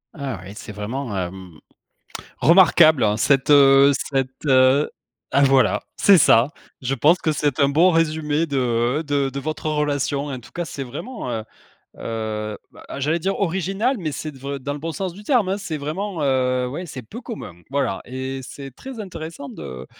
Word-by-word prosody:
Ah 135 - -5
oui, 100 - -9
c'est 110 - -9
vraiment, 105 +2 -4
hem, 90 -2 -6 0.8
remarquable 155 - +5
cette, 135 +4 +2
heu, 140 0 +7
cette, 135 0 -3
heu 130 +2 +4 0.4
ah 140 - +5
voilà! 135 -1 +3 0.2
C'est 195 -3 +6
ça! 125 0 +5 0.3
Je 130 +2 -1
pense 150 +8 +4
que 155 -3 -1
c'est 145 -3 -1
un 140 0 +4
bon 170 +6 +5
résumé 160 -1 +1
de 125 +1 0
de 140 -2 0
de 140 +1 -5
votre 155 +1 -3
relation! 145 -1 -1
En 135 -3 -5
tout - - -16
cas 175 -1 -4
c'est 135 -1 -6
vraiment, 145 - -6
heu 110 -2 -2 0.6
heu 110 -1 -4
bah - - -15
ah - - -6
j'allais 155 +5 0
dire 195 +4 -1
original, 195 - 0
mais 155 -4 -3
c'est 155 +2 -5
de 135 - -15
vr 140 +1 -5
dans 145 +2 -4
le 145 - -7
bon 165 +2 -4
sens 185 +1 -4
du 205 +3 -12
terme, 225 -6 +2
hein! 195 - 0
C'est 165 -6 -4
vraiment, 160 +3 -4
heu, 130 -2 +1
ouais 170 +8 -6
c'est 130 -3 -8
peu 230 - -9
commun. 225 - -7 0.2
Voilà 140 +1 -1
et 130 +1 -5
c'est 135 +1 -9
très 260 -4 -9
intéressant 160 -7 -7
de 65 0 -8
140 Hz, 185 wpm, -22 LUFS, 130-165 Hz, 0.8 s, heu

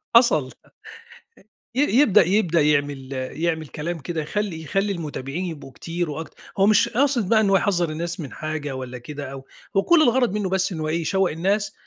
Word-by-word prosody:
حصل. 155 - +5 1.2
ي 265 - +3
يبدأ 250 - +5
يبدأ 180 -4 +2
يعمل 145 -3 0
يعمل 155 +5 -2
كلام 165 +4 -4
كده، 160 +3 -3
يخلّي 185 +1 -3
يخلّي 195 +6 -1
المتابعين 155 0 -4
يبقوا 155 -6 -7
كتير 170 +4 -4
وأكت 155 +2 -6 0.2
هو 195 - +4
مش 215 - +4
قاصد 245 -4 +1
بقى 220 -1 +5
إن 205 - +2
هو 195 - +5
يحذّر 175 -5 +1
الناس 170 +3 -4
من 145 -5 -6
حاجة 155 -3 -4
والّا 130 -1 -6
كده 140 +2 -7
أو 135 -1 -9 0.3
هو 195 - +4
كل 340 +5 +5
الغرض 245 -6 +3
منه 205 -3 -1
بس 190 +1 +1
إن 170 - -5
هو 155 - -2
إيه، 165 +2 0
يشوّق 190 +3 +1
الناس 195 +6 0
170 Hz, 185 wpm, -23 LUFS, 150-200 Hz, 1.2 s, حصل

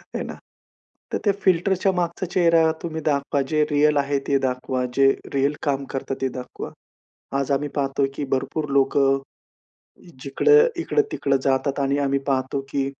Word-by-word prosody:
हे - - -2
ना? - - -6 0.8
तर - - +2
त्या 200 - +4
फिल्टरच्या 190 +1 +2
मागचा 175 0 -2
चेहरा 165 -2 +3
तुम्ही 160 -1 -4
दाखवा, 140 -1 +1
जे 155 -1 +2
रिअल 150 0 +3
आहे 140 0 +1
ते 140 - +3
दाखवा, 125 0 -2
जे 135 0 +5 0.2
रिअल 140 +2 +2
काम 140 -2 0
करता, 135 0 -3
ते 135 - +1
दाखवा. 125 - -8 0.7
आज 140 +1 -1
आम्ही 140 +2 +1
पाहतो 140 0 -1
आहे 135 0 +1
की 145 - -3
भरपूर 150 +3 -1
लोकं 135 0 +3 1.0
जिकडं 445 - +4
इकडं-तिकडं 420 - 0
जातात 135 +1 0
आणि 140 +1 +1
आम्ही 140 -1 +1
पाहतो 130 0 0
की 135 -1 -1
140 Hz, 155 wpm, -23 LUFS, 135-160 Hz, 1.0 s, जे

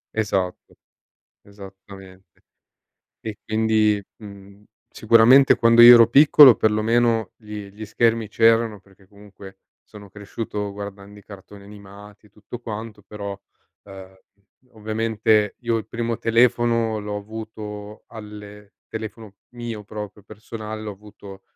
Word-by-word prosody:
Esatto, 95 -4 -3 0.7
esattamente. 95 -2 -15 0.8
E 110 -1 -8
quindi, 110 -2 +1
mhmm, 100 -1 -14 0.3
sicuramente 115 +5 +5
quando 115 0 +3
io 120 +1 +11
ero 115 -1 +6
piccolo 140 -1 +7
perlomeno 110 0 0
gli 105 -2 -10
gli 105 +2 -10
schermi 115 +1 0
c'erano, 115 -1 +1
perché 95 0 -25
comunque 100 -1 -16 0.3
sono 100 -2 -15
cresciuto 105 0 -6
guardando 100 0 -10
i - - -23
cartoni 100 0 -14
animati 100 0 -15
e 105 - -25
tutto 105 +4 -11
quanto, 110 -1 -8
però 100 -2 -8 0.4
ehm, 95 -1 -13 0.5
ovviamente 110 -1 -1
io 120 -2 -1
il 110 - -5
primo 115 -1 -4
telefono 115 -1 +1
l'ho 105 0 -6
avuto 105 0 -9
alle 105 -2 -12
telefono 110 -2 -9
mio 120 -3 -8
proprio 105 -1 -9
personale, 110 0 -9
l'ho 105 - -6
avuto 100 -1 -14
105 Hz, 115 wpm, -21 LUFS, 100-115 Hz, 0.8 s, io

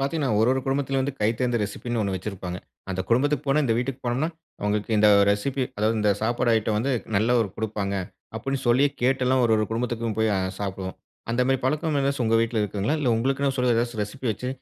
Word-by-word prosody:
பாத்தீங்கன்னா, 140 -1 0
ஒரு 110 - +4
ஒரு 130 - 0
குடும்பத்துலயும் 135 0 0
வந்து 140 +1 -3
கைத்தேர்ந்த 120 +3 +1
ரெசிபின்னு, 115 +3 -3
ஒண்ணு 100 -2 -1
வச்சிருப்பாங்க. 90 -2 -5 0.3
"அந்த 95 - -2
குடும்பத்துக்கு 145 +5 +2
போனா, 140 +3 +3
இந்த 115 -4 +2
வீட்டுக்கு 125 +1 -3
போனோம்னா, 125 +6 0 0.3
அவங்களுக்கு 105 +1 -1
இந்த 105 0 +6 0.2
ரெசிபி, 130 +7 0
அதாவது 110 +2 +1
இந்த 105 -1 +3
சாப்பாடு 120 +1 +1
ஐட்டம் 110 -1 0
வந்து 135 +5 0 0.2
நல்ல 115 +5 +3
ஒரு 110 - 0
குடுப்பாங்க" 105 -2 -2 0.4
அப்படின்னு 135 +4 -2
சொல்லி 130 +4 +5 0.2
கேட்டெல்லாம் 130 0 +2
ஒரு 115 - +3
ஒரு 110 - +1
குடும்பத்துக்கும் 115 -1 -2
போய் 110 0 +2
அ - - +1 0.2
சாப்டுவோம். 95 -2 -4 0.3
அந்த 120 +2 +2
மாரி 135 0 +2
பழக்கம் 150 +3 0
ஏதாச்சும் 140 -2 0
உங்க 115 0 +3
வீட்டுல 115 -1 0
இருக்குதுங்களா? 105 +7 -1
இல்ல, 145 -4 0
உங்களுக்குன்னு 135 +3 0
சொல்லி 125 -1 +2
ஏதாச்சும் 120 -1 -1
ரெசிபி 125 +6 -6
வச்சு, 125 +4 -5
120 Hz, 195 wpm, -25 LUFS, 105-135 Hz, 0.4 s, இந்த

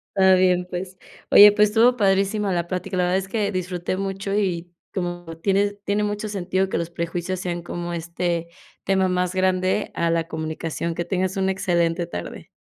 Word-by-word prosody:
Está 190 -1 +6
bien, 180 -1 +2
pues. 185 +1 -6 0.3
Oye, 205 0 +9
pues 210 0 +4
estuvo 235 +3 +4
padrísima 200 -1 +1
la 175 -1 -1
plática. 185 0 -3
La 180 - +2
verdad 180 +1 +2
es 195 0 -4
que 205 -1 0
disfruté 180 0 -2
mucho, 195 +1 -3
y 180 -4 -1 0.2
como 175 -3 -4
tiene 200 +3 +1
tiene 205 +1 +1
mucho 210 +1 -2
sentido 190 -1 -1
que - - -2
los 170 0 -3
prejuicios 175 +2 -3
sean 175 -1 -3
como 175 0 -5
este 170 0 -2 0.3
tema 190 -1 +2
más 180 0 0
grande 185 +2 +1
a 170 0 +1
la 165 0 0
comunicación. 160 +1 -4
Que 175 - -2
tengas 185 +1 -1
una 190 0 +1
excelente 170 -2 0
tarde. - - -7
185 Hz, 180 wpm, -23 LUFS, 175-195 Hz, 0.3 s, Oye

